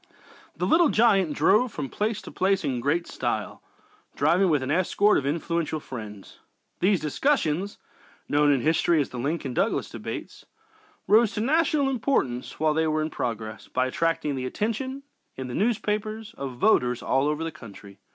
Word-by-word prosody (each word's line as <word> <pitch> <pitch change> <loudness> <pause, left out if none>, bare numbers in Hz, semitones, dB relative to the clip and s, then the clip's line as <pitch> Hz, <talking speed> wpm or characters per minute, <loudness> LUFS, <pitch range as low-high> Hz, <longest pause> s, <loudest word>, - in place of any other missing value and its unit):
"The - - -1
Little 325 -1 +4
Giant" 195 -8 +3
drove 210 - +3
from 145 -7 -4
place 210 - -2
to - - -9
place 195 +1 +1
in 125 -3 -1
great 155 +7 0
style, - - -3 0.5
traveling 185 +2 +3
with 150 -4 +2
an 130 - -2
escort 185 +5 +3
of 140 - -4
influential 165 +1 -1
friends. 105 -8 -9 0.4
These 190 0 +3
discussions, 185 - 0 0.5
known 145 0 +3
in 135 -3 +2
history 165 +2 +2
as 145 - 0
the 125 - -6
"Lincoln 140 0 -2
Douglas - - 0
Debates," - - -7 0.6
rose 220 +1 +5
to 210 - -2
national 295 +2 +2
importance 230 - -1
while 155 0 +2
they 160 +1 +1
were 155 0 0
in 155 - -4
progress, 110 -4 -4
by 130 0 0
attracting 155 +2 -1
the 130 -1 -3
attention, 260 - -3 0.3
in 130 - -5
the - - -5
newspapers, 215 - -1
of 135 -2 -6
voters 125 - +2
all 135 +2 +1
over 150 +2 -1
the 165 - -3
country. 100 -8 -13
160 Hz, 165 wpm, -26 LUFS, 135-210 Hz, 0.6 s, rose